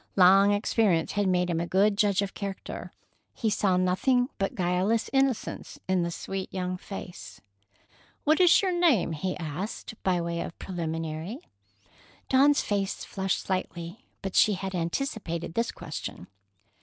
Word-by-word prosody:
Long 195 +2 +7
experience 205 -4 +2
had 205 -1 0
made 180 -1 +2
him 170 -2 0
a 170 - -2
good 200 +3 +3
judge 205 -1 +2
of 195 - -5
character. 200 -2 -6 0.4
He 220 -3 0
saw 190 -3 +2
nothing 245 +8 +2
but 195 - -1
guileless 185 +5 +1
innocence 270 -4 0
in 185 -1 +2
the 170 - -1
sweet 190 +2 -5
young 185 -1 -2
face. 185 -1 -9 0.8
"What 310 +4 +3
is 360 +2 +6
your 380 - +2
name?" 335 - +3
he 180 +4 -3
asked, 175 +7 -5
by 185 -2 +1
way 170 0 -2
of - - -6
preliminary. 165 +2 -4 0.9
Dawn's 280 +2 +5
face 200 -2 -2
flushed 190 -1 -1
slightly, 185 +3 -4 0.2
but 195 -1 -3
she 215 - +5
had 190 0 -4
anticipated 170 -2 -3
this 230 +4 0
question. - - -7
190 Hz, 145 wpm, -27 LUFS, 175-215 Hz, 0.9 s, Long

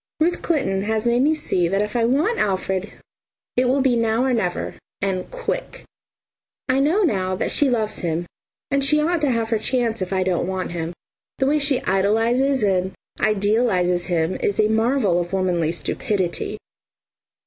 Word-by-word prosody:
Ruth 345 +3 +1
Clinton 270 - 0
has 220 +1 -1
made 240 +1 +3
me 305 +3 +3
see 180 - 0
that 195 +4 +1
if 210 +2 -5
I 235 -1 +2
want 300 - +1
Alfred 190 0 -1 0.6
it 250 - +3
will 265 +2 +2
be 260 -2 +3
now 230 +1 +1
or 260 -1 +1
never 180 -7 -1 0.3
and 190 -2 -2
quick. - - -4 0.8
I 260 0 +2
know 325 +10 +3
now 185 - 0
that - - -1
she 290 -2 +3
loves 220 -3 -1
him, 170 0 -2 0.5
and 275 0 +2
she 300 +2 +3
ought 330 +2 +1
to 290 - +2
have 230 -2 0
her 225 - +2
chance 230 -2 -1
if 185 - -3
I 190 -1 +1
don't 180 -2 0
want 190 -1 -3
him. 170 -1 -3 0.5
The 265 - +1
way 295 +3 +2
she 280 -2 +1
idolises 225 +7 +2
and 190 -2 +1 0.3
idealises 205 -4 +1
him 170 0 0
is 200 - -1
a 215 0 +4
marvel 220 -4 +2
of 175 +1 -4
womanly 175 -4 +1
stupidity. 190 +2 -2
220 Hz, 175 wpm, -22 LUFS, 185-265 Hz, 0.8 s, a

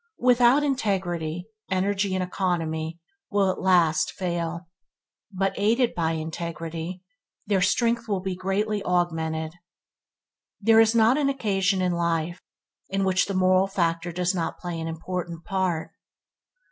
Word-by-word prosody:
Without 245 +3 +4
integrity, 180 - -1 0.2
energy 195 +1 0
and 185 - 0
economy 170 -3 -2 0.3
will 200 -2 +2
at - - -6
last 175 -4 +3
fail, 170 -1 -3 0.6
but 195 0 0
aided 230 +4 +2
by 165 -1 0
integrity, 165 +2 -5 0.4
their 195 -2 +1
strength 235 +3 +1
will 200 -3 0
be 185 0 -3
greatly 200 +3 -1
augmented. 160 -3 -1 1.1
There 225 +2 +5
is 225 +1 +5
not 230 +5 +5
an 280 -2 +2
occasion 195 -7 +1
in 180 - +1
life 170 0 -1 0.5
in 195 0 0
which 185 -1 +2
the 200 - -3
moral 185 +1 +4
factor 170 -3 -1
does 180 +2 0
not 170 -3 -2
play 175 -2 -5
an 165 - -4
important 170 0 -5
part. 185 -4 -1
185 Hz, 135 wpm, -25 LUFS, 170-200 Hz, 1.1 s, There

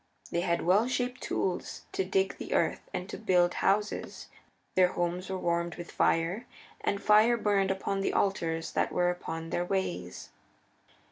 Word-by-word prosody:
They 170 - +1
had 170 -1 0
well 200 +7 +4
shaped 250 0 -2
tools 185 - -2
to - - 0
dig 190 +1 0
the - - -3
earth - - 0
and 180 - -4
to - - -7
build 180 -5 +3
houses. 210 +2 0 0.4
Their 185 -1 +4
homes 175 +2 -2
were 190 - -2
warmed 170 -1 -1
with 175 - -8
fire, 175 +9 +1 0.4
and 200 - 0
fire 215 +4 +5
burned 200 -3 +2
upon 195 +1 -1
the - - 0
altars 165 -4 0
that - - 0
were 180 0 +2
upon 165 -2 -6
their 175 - 0
ways. 175 - -3
185 Hz, 160 wpm, -30 LUFS, 175-200 Hz, 0.4 s, fire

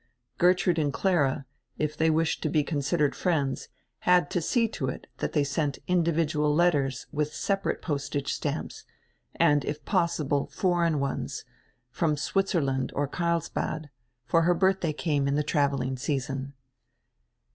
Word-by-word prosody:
Gertrude 180 -1 +3
and 145 -2 +1
Clara, 145 -7 +1 0.3
if 150 0 -1
they 160 +1 +2
wished 160 +1 +1
to 155 - 0
be 150 0 +2
considered 145 0 0
friends, 145 -7 -1 0.3
had 180 -5 +3
to 175 - 0
see 230 +8 +2
to 135 -10 -3
it 130 - -5
that - - -2
they 150 - +3
sent 145 0 -1
indi 175 -2 +2
vidual 150 -2 +1
letters 145 -6 +2
with 150 0 -2
separate 195 -1 -1
postage 145 -2 -2
stamps, - - -4 0.5
and, 145 -1 +4
if 150 +1 -5
possi 170 -6 +1
ble, 140 -1 +1
foreign 170 -4 +1
ones, 140 -1 -3 0.5
from 155 0 0
Switzerland 140 -5 0
or 145 0 0
Carlsbad, 160 -2 -2 0.3
for 165 +8 +3
her 175 +1 +3
birthday 190 -2 +2
came 145 -2 0
in 140 - +1
the 150 - +1
traveling 140 -4 0
season. 135 0 -3
150 Hz, 145 wpm, -27 LUFS, 140-170 Hz, 0.5 s, and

